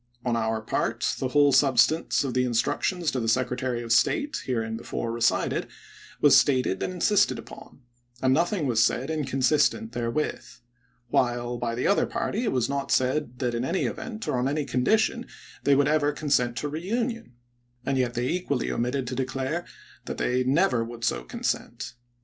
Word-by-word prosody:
On 120 -1 +1
our 110 -1 -1
part, 110 - -1
the 130 - 0
whole 145 +2 +4
substance 135 +4 +3
of 135 -3 -3
the 125 - +2
instructions 145 +8 0
to 130 - -2
the 115 - -2
Secretary 125 0 0
of 115 - -5
State, 295 - +2
hereinbefore 115 -1 -3
re 115 0 -5
cited, 120 - +1 0.5
was 145 - +6
stated 130 -9 +3
and - - -1
insisted 205 +3 +2
upon, 115 +3 -12 0.4
and 130 0 +3
nothing 170 +2 +1
was 115 -4 +3
said 135 +5 0
inconsistent 135 -5 +1
therewith; 120 +5 -2 0.7
while, 120 -1 0
by 115 -1 -2
the 125 - -2
other 200 - +3
party, 220 +5 -2
it 215 - +1
was 125 -3 +1
not 140 0 -3
said 130 -1 +1
that 125 -2 -1
in 120 +1 -1
any 175 +8 0
event 225 -3 -5
or 125 - 0
on 125 - +1
any 145 +1 -1
condition 220 - +1 0.4
they 140 0 +4
ever 145 +1 +3
would 145 - -1
consent 125 -5 +1
to 150 - -2
reunion; 225 - -3 0.5
and 135 -1 0
yet 125 -1 0
they 120 +1 -1
equally 155 -5 -1
omitted 125 +2 -1
to 125 - -5
declare 135 +6 -2 0.4
that - - -5
they 125 +1 +1
never 130 -3 +2
would 115 0 -9
so - - 0
consent. 120 - -4
130 Hz, 175 wpm, -26 LUFS, 120-150 Hz, 0.7 s, was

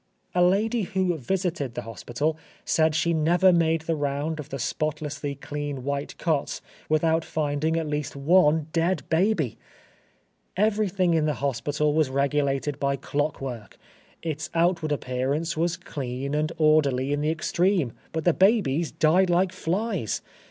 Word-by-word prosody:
A 180 - +2
lady 215 +6 +3
who 185 -2 0
visited 160 - -2
the 120 - -4
hospital 120 +7 -2 0.3
said 160 -1 +2
she 170 +1 +2
never 175 +4 +4
made 165 -1 +2
the 160 0 -1
round 145 +2 -2
of 150 -1 -7
the 135 - -4
spotlessly 150 +1 -3
clean 145 -1 -5
white 140 +1 -3
cots, 155 -5 -1 0.3
without 160 +1 +2
finding 155 0 -1
at 165 - -1
least 150 -1 -3
one 155 +1 +4
dead 170 +1 +1
baby! 165 - +1 1.0
Everything 200 -4 +2
in 160 -2 +2
the 150 -2 0
hospital 145 +3 0
was 155 -3 +2
regulated 140 +1 0
by 140 0 +1
clockwork; 135 -7 -4 0.5
its 160 -1 -3
outward 165 -2 +2
appearance 140 +4 -1
was 170 +2 0
clean 140 -6 -5
and 155 +1 0
orderly 145 -4 +3
in 145 - -1
the 150 - +1
extreme, 170 - +1 0.2
but 160 -1 -3
the 175 - +4
babies 185 - +2
died 180 +4 +3
like 175 +1 +2
flies! 190 - -2
155 Hz, 145 wpm, -25 LUFS, 140-170 Hz, 1.0 s, never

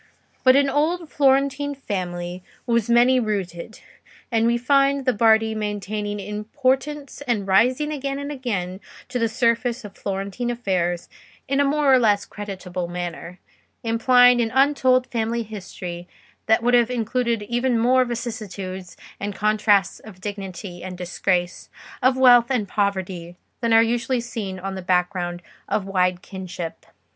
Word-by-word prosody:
But 255 0 +6
an 280 0 +4
old 310 +4 0
Florentine 280 +1 +2
family 180 -7 -4 0.2
was 235 -2 +1
many 245 +2 +5
rooted, 200 -3 -4 0.5
and 225 0 +2
we 235 0 +2
find 275 +2 +2
the 255 - +3
Bardi 220 0 +4
maintaining 210 -1 -3
importance 260 +8 -2
and 220 -5 0
rising 250 +10 +3
again 275 -2 -3
and 285 +1 -5
again 200 -9 -3 0.3
to 250 0 -2
the 230 -1 +1
surface 235 +1 0
of 200 - -10
Florentine 200 +5 -3
affairs 185 -7 -1 0.4
in 275 +1 0
a - - +5
more 285 -1 +3
or 260 - +6
less 210 -4 +2
creditable 185 -3 -6
manner, 175 0 -6 0.5
implying 245 +2 +5
an 225 - 0
untold 265 -2 +4
family 235 -2 -2
history 180 -4 -8 0.4
that 220 +1 +3
would 245 +1 +2
have 240 -1 +4
included 235 -1 -1
even 240 +3 0
more 255 +3 +4
vicissitudes 210 -6 -6 0.2
and 200 0 -4
contrasts 210 -2 +2
of 200 -4 -13
dignity 195 -2 -7
and 185 -1 -7
disgrace, 180 0 -2 0.3
of 255 0 +3
wealth 245 -2 +6
and 240 -6 0
poverty, 185 -4 -2 0.2
than 235 -1 0
are 225 0 +7
usually 240 +2 0
seen 220 -5 -5
on 195 +1 -5
the 190 - -5
background 180 -1 -1 0.3
of 200 - 0
wide 180 -1 0
kinship. 180 -4 -7
225 Hz, 145 wpm, -23 LUFS, 190-250 Hz, 0.5 s, are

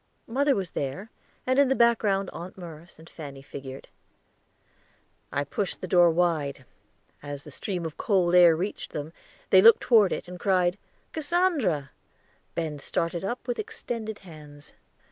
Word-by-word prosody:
Mother 275 +4 +2
was 190 -4 -3
there, 180 - -4 0.3
and 260 +1 +2
in 280 - +6
the 265 - +2
background 215 -5 +2
Aunt 175 +3 -8
Merce 170 -2 -11
and 160 - -15
Fanny 140 -5 -9
figured. 135 -1 -9 1.4
I 145 - 0
pushed 185 +7 -3
the 185 - -5
door 175 -1 +6
wide; 160 -6 0 0.6
as 145 -1 -7
the 150 - -11
stream 180 +4 -4
of 160 - -6
cold 185 -5 +2
air 175 -2 +7
reached 190 +6 -4
them, 150 +2 -5 0.4
they 190 - +8
looked 230 +3 +8
toward 220 -6 +5
it, - - -3
and 180 0 -9
cried 185 -1 +2 0.3
"Cassandra!" 295 - 0 0.6
Ben 155 -3 -3
started 165 +4 -2
up 240 +7 -4
with 245 - -2
extended 225 - -5
hands. 150 -3 -13
180 Hz, 150 wpm, -27 LUFS, 155-215 Hz, 1.4 s, they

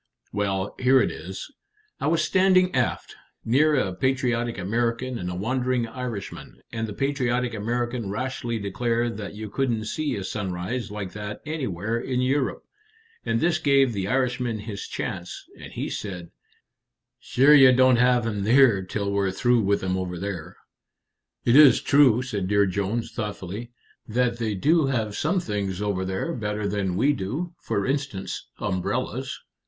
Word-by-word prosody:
"Well, 100 -1 -1
here 130 +1 +5
it - - +1
is. 95 - -8 0.5
I - - -1
was 160 0 +2
standing 185 0 +4
aft, 125 -3 -1 0.3
near 150 +6 +4
a 95 -9 0
patriotic 120 0 0
American 115 +5 -1
and 90 -1 -4
a 90 - -4
wandering 125 +4 0
Irishman, 120 -4 -7
and 115 0 -3
the 105 - -6
patriotic 125 -2 0
American 120 +1 -2
rashly 120 +1 -3
declared 115 +3 -1
that 105 -1 -6
you 110 +1 -6
couldn't 115 -1 -1
see 155 +7 -2
a 100 - -4
sunrise 100 +4 -3
like 105 -3 -5
that 105 0 -6
anywhere 115 - -2
in 125 +1 -2
Europe, 130 +1 0 0.6
and 115 0 +1
this 170 +2 +2
gave 135 -4 +3
the 95 -2 -2
Irishman 125 -2 0
his 105 -2 -6
chance, 85 +1 -5
and - - -10
he - - -3
said, 90 -5 -6 0.9
'Sure 140 +4 +4
ye 135 -3 +8
don't 130 0 +5
have'm 120 -4 +2
here 115 -2 +5
till 100 +2 -3
we're 100 -1 +1
through 120 +5 +2
with 100 -1 +1
'em 95 0 0
over 90 -1 -3
there.'" 90 -3 -5 0.9
"It 120 - +4
is 145 -5 +8
true," 130 -4 +4
said 100 -7 -3
Dear 100 +1 +3
Jones, 100 +4 -2
thoughtfully, 105 +1 -5 0.4
"that 120 +1 0
they 110 -3 -1
do 150 - +3
have 110 -6 -1
some 180 +5 +1
things 100 - -3
over 100 -2 -1
there 95 - -2
better 105 -3 -2
than 100 -3 -1
we 140 +7 +3
do; 145 - -4
for 100 - -2
instance, 135 -8 -3
umbrellas." 95 -1 -2
115 Hz, 155 wpm, -25 LUFS, 100-130 Hz, 0.9 s, ye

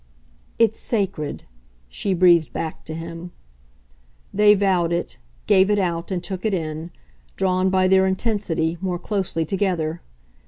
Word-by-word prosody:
"It's 225 -1 +2
sacred," 195 -9 -2 0.4
she 185 - -2
breathed 175 -2 +4
back 160 -1 -5
to 155 - -6
him. 165 +1 -7 1.0
They 210 +1 +6
vowed 185 -4 +1
it, 170 - -3 0.3
gave 190 +1 +4
it 210 - +3
out 170 -3 -1
and 180 -2 -2
took 185 0 -5
it 215 -3 +1
in, 160 -1 -4 0.5
drawn, 185 0 +1
by 185 0 +3
their 190 0 +4
intensity, 190 -5 -1
more 185 -2 -1
closely 180 -4 -2
together. 170 -3 -1
185 Hz, 135 wpm, -22 LUFS, 165-195 Hz, 1.0 s, They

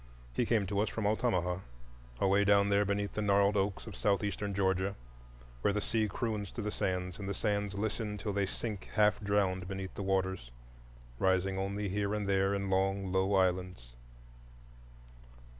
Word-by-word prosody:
He - - 0
came 110 -4 +2
to 100 +1 -1
us 105 0 +1
from 110 0 -3
Altamaha, 95 -5 +1 0.6
away 100 +1 +4
down 100 0 +4
there 100 0 +3
beneath 100 0 -1
the 105 - -2
gnarled 100 0 +3
oaks 100 0 0
of 110 - -8
Southeastern 100 0 0
Georgia, 95 0 +1 0.7
where 100 - +2
the 105 - 0
sea 110 +1 0
croons 105 -2 -3
to 115 - -4
the 105 - -2
sands 90 -1 -2
and 100 -1 -4
the 100 - -2
sands 100 -1 -1
listen 105 0 -2
till 105 0 -3
they 100 -1 +1
sink 105 0 -5
half 105 -1 +4
drowned 100 -3 0
beneath 95 -1 -5
the - - -6
waters, 95 -8 -1 0.7
rising 95 0 +2
only 100 +1 -2
here 100 +2 -1
and 105 -2 -2
there 95 0 +2
in 100 -1 -2
long, 95 0 +1
low 95 +1 +2
islands. 90 -9 0
100 Hz, 170 wpm, -32 LUFS, 95-105 Hz, 0.7 s, away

